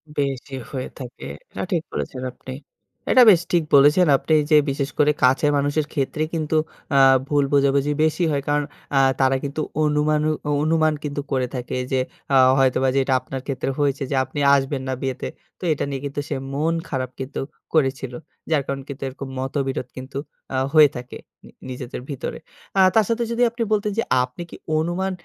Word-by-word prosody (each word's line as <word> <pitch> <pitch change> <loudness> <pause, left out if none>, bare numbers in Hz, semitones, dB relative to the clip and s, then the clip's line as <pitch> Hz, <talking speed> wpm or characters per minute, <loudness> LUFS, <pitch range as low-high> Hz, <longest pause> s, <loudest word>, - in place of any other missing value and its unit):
বেশি 135 -1 -2 0.2
হয়ে 130 -2 -4
থাকে। 125 -2 -9 0.3
এটা - - -4
ঠিক 170 -3 +1
বলেছেন 130 - -4
আপনি। 130 +1 -9 0.6
এটা 255 - +8
বেশ 175 -2 +4
ঠিক 170 -2 +3
বলেছেন 150 +5 +6
আপনি 160 - -1 0.2
যে, - - +7
বিশেষ 140 0 -2
করে 150 0 +5
কাছের 135 +3 +4
মানুষের 145 +2 0
ক্ষেত্রে 150 +1 -1
কিন্তু 160 -1 -1 0.4
অ্যা 135 -1 +5 0.3
ভুল 145 0 +2
বোঝাবুঝি 140 +1 +3
বেশি 160 +3 +1
হয়। 140 -1 0
কারণ 145 0 +2 0.3
অ্যা 135 - +5 0.2
তারা 135 0 +4
কিন্তু 145 +2 -3 0.2
অনুমানু 150 0 +2 0.2
অ - - +1
অনুমান 155 0 +2
কিন্তু 145 -1 -3
করে 130 -2 +1
থাকে 125 0 -4 0.2
যে, 130 - +2 0.3
অ্যা 135 - +5 0.2
হয়তোবা 130 0 +3
যে, - - +4
এটা 130 - 0
আপনার 130 +1 -6
ক্ষেত্রে 135 -1 -2
হয়েছে। 140 -1 +1
যে, - - +1
আপনি 145 - -6 0.2
আসবেন 135 0 -1
না 130 - -1
বিয়েতে। 130 -2 -3 0.3
তো - - -13
এটা - - -3
নিয়ে 135 -1 -4
কিন্তু 140 +1 -4
সে 145 - -1 0.2
মন 160 +4 +1 0.2
খারাপ 130 -3 -2
কিন্তু 130 +2 -5 0.3
করেছিল। 135 -4 +1 0.4
যার 150 - +3
কারণে 135 0 -3
কিন্তু 140 0 -6
এরকম 135 +1 -8
মতবিরোধ 135 -1 -2
কিন্তু 130 +1 -7 0.4
আ - - +1 0.2
হয়ে 155 -2 +8
থাকে, 125 0 -8 0.3
নি - - -14 0.2
নিজেদের 125 0 -6
ভিতরে। 140 - -4 0.4
আ - - +7
তার 220 - +5
সাথে 235 +1 +1
যদি 235 +1 +1
আপনি 235 0 -3
বলতেন 210 0 0
যে, - - +2 0.2
আপনি 125 +7 -7
কি - - -10 0.2
অনুমান 175 +4 -1
140 Hz, 185 wpm, -22 LUFS, 135-155 Hz, 0.6 s, এটা